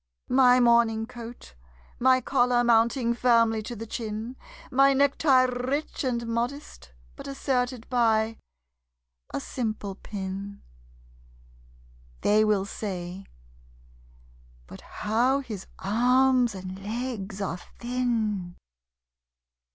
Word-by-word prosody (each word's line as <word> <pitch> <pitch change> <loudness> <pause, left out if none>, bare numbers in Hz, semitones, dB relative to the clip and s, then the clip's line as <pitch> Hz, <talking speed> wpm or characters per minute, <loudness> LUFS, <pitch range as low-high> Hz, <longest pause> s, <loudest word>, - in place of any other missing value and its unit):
My 255 -1 +6
morning 235 -2 +3
coat, 235 - -10 0.5
my 255 +1 +4
collar 245 -2 +2
mounting 235 +1 +3
firmly 230 -2 +3
to 240 +3 -7
the 225 +1 -7
chin, 220 +2 -5 0.4
My 275 +1 +5
necktie 275 -1 +4
rich 255 +5 -2
and 240 -3 -1
modest, 235 - -4 0.2
but - - -9
asserted 255 -3 -2
by 225 -3 +1 0.9
a - - -2
simple 215 - -4
pin 195 0 -7 1.6
(They 215 +1 +4
will 210 -3 +2
say: 190 -2 -6 1.4
"But - - -12
how 240 +6 0
his 215 -8 -8
arms 250 +2 +3
and 190 +1 -8
legs 215 -3 -4
are 185 -3 -3 0.2
thin!") 225 -7 -2
235 Hz, 95 wpm, -26 LUFS, 210-250 Hz, 1.6 s, My